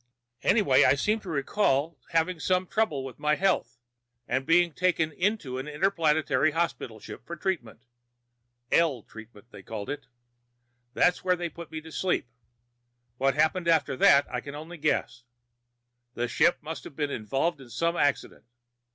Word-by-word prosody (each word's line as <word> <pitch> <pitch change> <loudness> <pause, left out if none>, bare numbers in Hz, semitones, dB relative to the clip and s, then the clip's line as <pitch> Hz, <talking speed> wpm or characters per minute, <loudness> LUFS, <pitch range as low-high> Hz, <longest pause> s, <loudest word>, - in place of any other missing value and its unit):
"Anyway, 195 - +4
I - - +5
seem 210 +10 0
to 195 - -10
recall 150 0 0
having 165 +1 0
some 185 +2 +1
trouble 170 -10 -1
with 130 - -9
my 150 0 +2
health, 190 -7 0 0.5
and 135 0 -1
being 170 0 +4
taken 170 -3 +1
onto 190 -12 0
an 135 - -6
inter 150 +6 +1
planetary 155 -5 +2
hospital 165 -9 -2
ship 110 - -10
for 170 +7 -7
treatment 160 - -3 0.9
L 150 -9 +2
treatment, 110 0 -14
they - - -11
called 110 +5 -6
it. 145 -1 -7 0.9
That's 180 - +3
where 180 -1 +3
they 175 -1 -4
put 170 +2 -10
me 155 0 -5
to 160 +1 -12
sleep. 180 -3 0 0.9
What 135 0 +2
happened 170 +2 +1
after 165 -5 +2
that, 140 +2 +6
I 125 - -1
can 140 +2 -8
only 160 +4 -8
guess. 125 -3 -1 0.9
The 120 +1 -1
ship 145 +8 +3
must 160 +2 -6
have 140 - -10
been 145 -2 -2
involved 135 +8 -1
in 130 - -13
some 165 +9 -1
accident. 145 -7 -1
155 Hz, 160 wpm, -27 LUFS, 135-175 Hz, 0.9 s, that